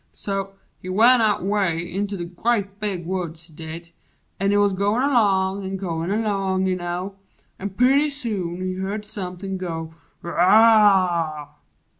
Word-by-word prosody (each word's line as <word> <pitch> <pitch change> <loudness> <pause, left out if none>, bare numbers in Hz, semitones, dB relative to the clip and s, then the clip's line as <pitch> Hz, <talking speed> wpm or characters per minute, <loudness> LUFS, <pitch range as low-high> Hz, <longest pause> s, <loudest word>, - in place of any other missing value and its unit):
So, 195 -1 -4 0.3
he 185 - -7
went 230 +6 +5
out 210 -4 +2
'Way 195 -4 +1
in 190 +4 -3
the 195 -4 -5
grea' 200 +4 0
big 195 -5 -3
woods 170 -3 -4
he 165 - -18
did. 165 +2 -9 0.5
An' 195 +1 +1
he 205 - +3
Wuz 205 -1 +3
goin' 205 +6 +1
along 200 -7 +2
an' 190 0 -4
goin' 170 -2 -3
along, 195 -3 0
you 185 -1 +1
know, 180 +2 -5 0.4
An' 200 - -3
purty 265 +8 +3
soon 205 -11 -4
he 185 0 -2
heerd 195 +3 -4
somepin' 190 -2 -5
go 165 -3 -5 0.3
"Wooh!" 185 -5 +4
190 Hz, 150 wpm, -22 LUFS, 175-205 Hz, 0.5 s, went